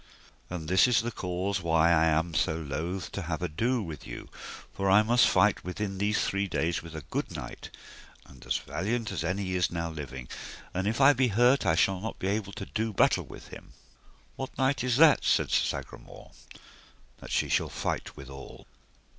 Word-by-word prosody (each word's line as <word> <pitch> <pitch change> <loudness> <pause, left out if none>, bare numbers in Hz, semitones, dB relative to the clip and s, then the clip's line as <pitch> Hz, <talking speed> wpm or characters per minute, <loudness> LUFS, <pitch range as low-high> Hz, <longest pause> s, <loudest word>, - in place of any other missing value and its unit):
And 85 -3 -5
this 95 +7 +5
is 115 -3 +3
the 120 - -2
cause 90 0 -2
why 80 0 +3
I 80 -1 +4
am 80 +1 +1
so 80 - +1
loath 80 +5 -4
to 100 - -4
have 80 0 -4
ado 110 +9 0
with 80 -4 -8
you; - - -8 0.4
for 95 0 -1
I 100 +3 +6
must 120 +3 +4
fight - - +3
within 95 +2 -4
these 105 +1 +1
three 100 0 -1
days 85 -1 -1
with 85 -1 -10
a 80 - -6
good - - -3
knight, - - -7 0.6
and 65 -3 -16
as - - 0
valiant 110 +5 -3
as 95 - -3
any 95 +2 -2
is 90 -1 +1
now 85 -1 -3
living, 65 -5 -7 0.5
and 95 +2 -1
if 115 +4 -1
I 140 +1 +7
be 130 0 +2
hurt 120 +5 +3
I 80 - +4
shall 95 +3 +2
not 110 - -5
be 95 - -2
able 100 -1 -2
to - - -6
do 110 0 -2
battle 100 - +2
with - - -11
him. - - -12 0.6
What 135 - -6
knight 135 -1 +1
is 125 -1 +1
that, 155 -1 +6
said - - +2
Sir - - +3
Sagramore, - - -7 0.9
that - - -1
ye - - -1
shall - - +1
fight - - -4
withal? 70 0 -10
95 Hz, 195 wpm, -28 LUFS, 80-110 Hz, 0.9 s, I